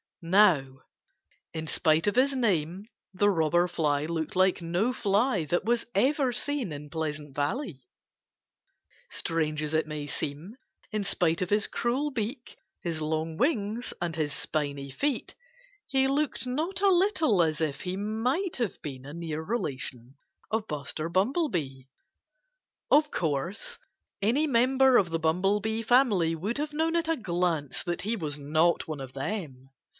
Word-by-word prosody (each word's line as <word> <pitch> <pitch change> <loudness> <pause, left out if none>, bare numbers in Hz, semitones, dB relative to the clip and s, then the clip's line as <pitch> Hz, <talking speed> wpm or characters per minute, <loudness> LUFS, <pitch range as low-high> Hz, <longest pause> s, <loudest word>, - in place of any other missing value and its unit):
Now, 165 -8 +4 0.7
in 160 -1 -4
spite 160 +1 +2
of 205 - +1
his 270 +2 +3
name 190 - 0 0.3
the 205 +2 +3
Robber 175 0 +2
Fly 150 -4 0
looked 160 0 -3
like 185 -1 +3
no 175 +9 0
fly 205 -3 +1
that 175 +6 0
was 235 0 +1
ever 265 +4 +3
seen 265 - -1
in 145 0 -8
Pleasant 150 -3 -4
Valley. 145 - -2 1.3
Strange 155 -2 -1
as 150 0 -3
it 155 -1 +1
may 150 -1 -4
seem, 150 - -5 0.3
in 215 -2 -1
spite 175 -4 +1
of 180 - -1
his 210 +1 +3
cruel 265 +5 -1
beak, 240 +1 -4 0.3
his 165 -2 -2
long 160 +1 -1
wings, 235 -4 0
and 170 -2 -2
his 155 -2 -1
spiny 140 -2 -2
feet, 280 - -1 0.5
he 270 -2 +2
looked 280 0 0
not 315 +10 -2
a 400 - +5
little 340 - +3
as 155 -2 +1
if 150 -4 -1
he 185 +1 -3
might 240 - -1
have 235 -6 -2
been 135 -3 -6
a 145 - -8
near 165 -2 -4
relation 135 - -4 0.3
of 220 0 -1
Buster 150 +2 -3
Bumblebee. 185 - 0 1.1
Of 300 0 +5
course, 175 - -2 0.4
any 245 +10 +3
member 260 0 +4
of 185 - +3
the 165 0 -1
Bumblebee 195 +7 +1
family 220 -9 +3
would 205 - -3
have 300 0 -3
known 325 +2 +1
at 335 -1 +1
a 325 -1 +1
glance 170 - -1
that 175 -1 -2
he 220 +3 0
was 150 -8 -4
not 155 +4 +2
one 155 -3 -5
of 130 -1 -8
them. 135 -4 -5
180 Hz, 150 wpm, -28 LUFS, 155-240 Hz, 1.3 s, a